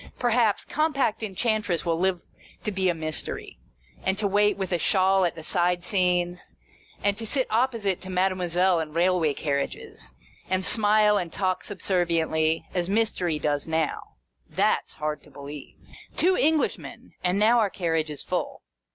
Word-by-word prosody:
Perhaps, 235 -3 +2
Compact 280 -8 0
Enchantress 210 -3 -1
will 165 -1 0
live 185 -1 +1 0.4
to 210 - -2
be 190 -1 +1
a - - +2
Mystery, 155 - -5 0.4
and 190 +1 0
to 210 -1 +1
wait 205 +1 +3
with 190 -2 -3
a 175 - +1
shawl 190 0 +3
at 170 - -1
the 160 - -9
side 175 +1 +1
scenes, 180 -2 0 0.6
and 205 0 +2
to - - -5
sit 260 +2 0
opposite 225 -5 +1
to 190 - -9
Made 185 +1 +2
moiselle 180 0 +1
in 155 -1 -6
railway 170 -3 +2
carriages, 140 - -4 0.3
and 185 0 0
smile 210 -1 +4
and 170 -2 -4
talk 185 -2 -1
subserviently, 165 -5 0
as 180 0 -1
Mystery 195 -6 0
does 145 -1 -1
now. 160 -1 0 0.5
That - - +1
's - - -11
hard 150 0 -3
to - - -18
believe! 140 0 -10 0.4
Two 370 +2 +4
Englishmen, 310 0 0
and 180 +1 +1
now 225 +4 +5
our 215 -3 +2
carriage 165 -4 -1
is 150 - -6
full. - - -3
185 Hz, 160 wpm, -26 LUFS, 165-210 Hz, 0.6 s, now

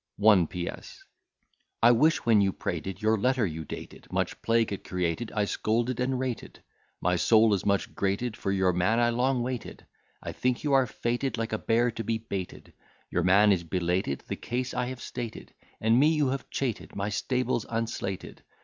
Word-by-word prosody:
1 100 -5 +5
P.S. 90 0 -7 0.8
I 120 - +8
wish, 155 +8 +3
when 110 -3 +5
you 100 -1 +2
prated, 95 +3 -4
your 110 0 +3
letter 125 +1 +2
you'd 80 -4 -5
dated: - - -9
Much - - -2
plague 115 -2 +2
it 100 - -6
created. 90 +4 -2
I 105 -1 +2
scolded 115 +4 -1
and 130 +1 0
rated; 130 -2 -5 0.4
My 90 +1 +1
soul 110 +4 +5
is 100 - -1
much 100 -1 +1
grated; 100 +4 -1
for 95 - -2
your 95 -2 +2
man 90 +6 +2
I 120 0 +3
long 125 +1 +1
waited. 125 -2 -5 0.4
I - - -4
think 125 -1 -1
you 145 -2 +1
are 135 -2 +4
fated, 120 +4 -2
like 115 -1 -3
a 110 - 0
bear 120 +2 +2
to 115 0 -5
be 115 +1 0
baited: 100 -5 -6 0.4
Your 90 - +1
man 100 +4 +5
is 90 -3 +2
belated: 90 -3 -1
the - - -3
case 125 +1 -3
I 125 - -1
have 130 -1 -6
stated; 120 -3 -7 0.3
And 115 +2 +3
me 145 - +6
you 150 -4 +2
have 135 +1 -4
cheated. 125 -6 -3
My 100 +1 -2
stable's 125 +2 -1
unslated. 115 -4 -4
110 Hz, 185 wpm, -28 LUFS, 95-125 Hz, 0.8 s, I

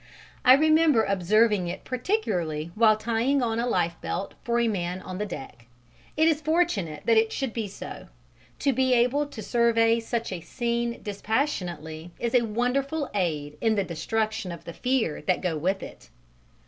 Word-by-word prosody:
I 255 - +8
remember 310 -4 +4
observing 200 0 +2
it 175 - -5
particularly 180 - -2
while 215 0 +4
tying 235 +5 +1
on 225 -1 0
a 240 - 0
lifebelt 170 -2 -2
for 235 0 +1
a 235 - +2
man 180 -4 -2
on 185 0 -7
the 210 - -2
deck. 125 -9 -9 0.5
It 315 +1 +4
is 315 -2 +2
fortunate 285 - 0
that 230 -1 +4
it 220 0 +3
should 265 -5 -3
be 225 -3 -2
so: 195 - -9 0.5
to 275 - +1
be 260 0 +3
able 250 +5 +2
to 225 -6 -8
survey 230 0 +3
such 230 -1 -3
a 180 -3 -4
scene 235 +3 -2
dispassionately 180 - -3
is 235 -1 -2
a 250 - +5
wonderful 260 +6 -1
aid 155 -7 -2
inn 225 -1 +2
the 200 - +1
destruction 215 +4 -2
of 170 - -8
the 170 - -8
fear 250 - 0
that 180 +4 +1
go 180 -3 -1
with 185 +6 -1
it. - - -11
225 Hz, 170 wpm, -26 LUFS, 180-250 Hz, 0.5 s, I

